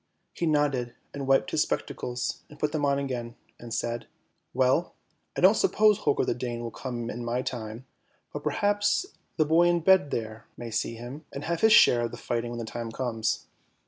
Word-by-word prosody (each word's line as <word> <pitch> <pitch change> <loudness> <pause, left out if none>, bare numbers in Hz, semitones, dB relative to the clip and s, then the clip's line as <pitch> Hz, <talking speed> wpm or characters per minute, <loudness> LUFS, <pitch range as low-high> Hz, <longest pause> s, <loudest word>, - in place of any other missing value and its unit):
He 170 - -1
nodded, 140 -6 +1 0.2
and 140 -1 -5
wiped 135 0 +3
his - - +2
spectacles, 125 0 -2
and 150 - -13
put 150 0 0
them 155 -2 -2
on 140 -1 +3
again, 125 -4 -4 0.2
and 120 -1 -10
said, 115 0 -2 0.2
" - - -48
Well, 130 +6 +2 0.4
I - - 0
don't - - +8
suppose 215 - +3
Holger 145 - +1
the - - +1
Dane 120 -1 -4
will 115 -1 -5
come 120 -2 -5
in 120 - -5
my 120 +2 -1
time, 115 0 -5 0.5
but - - -4
perhaps 205 - +1 0.3
the 155 - +4
boy 165 +3 +4
in 175 -1 +2
bed 190 -3 +5
there 110 -2 -4
may 120 -1 -6
see 115 +1 -1
him, 125 +7 -8
and 140 - -6
have 170 0 -2
his 220 - +6
share 120 - +7
of 120 - -1
the - - -7
fighting 120 0 -2
when 120 - -5
the 115 - -4
time 115 0 -5
comes." 115 -3 -2
125 Hz, 205 wpm, -27 LUFS, 120-155 Hz, 0.5 s, don't